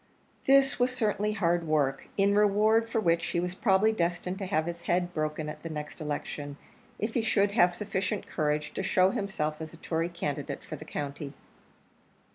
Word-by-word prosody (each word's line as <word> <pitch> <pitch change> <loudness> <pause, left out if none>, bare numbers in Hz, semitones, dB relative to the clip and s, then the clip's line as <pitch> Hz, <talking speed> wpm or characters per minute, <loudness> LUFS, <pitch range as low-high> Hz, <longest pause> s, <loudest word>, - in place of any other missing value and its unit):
This 275 0 +5
was 245 +1 +4
certainly 215 -4 0
hard 175 -4 +1
work; 140 -3 0
in 200 0 +4
reward 210 +2 +4
for 225 - 0
which 170 -4 +2
he 170 - 0
was 180 +1 -2
probably 195 +2 +3
destined 180 0 -1
to 195 - -3
have 160 -5 +1
his 170 0 -5
head 175 0 +1
broken 155 -1 -2
at 150 - -7
the 165 - -6
next 150 0 -6
election, 145 -1 -4 0.4
if 220 +2 -2
he 235 - +2
should 205 -2 +2
have 175 -4 +4
sufficient 200 0 -2
courage 150 -1 -1
to - - -2
show 190 0 +3
himself 155 -7 -2
as 160 0 -7
a - - -11
Tory 165 +1 -1
candidate 145 -5 -4
for - - -6
the - - -10
county. 145 0 -5
175 Hz, 185 wpm, -29 LUFS, 155-205 Hz, 0.4 s, This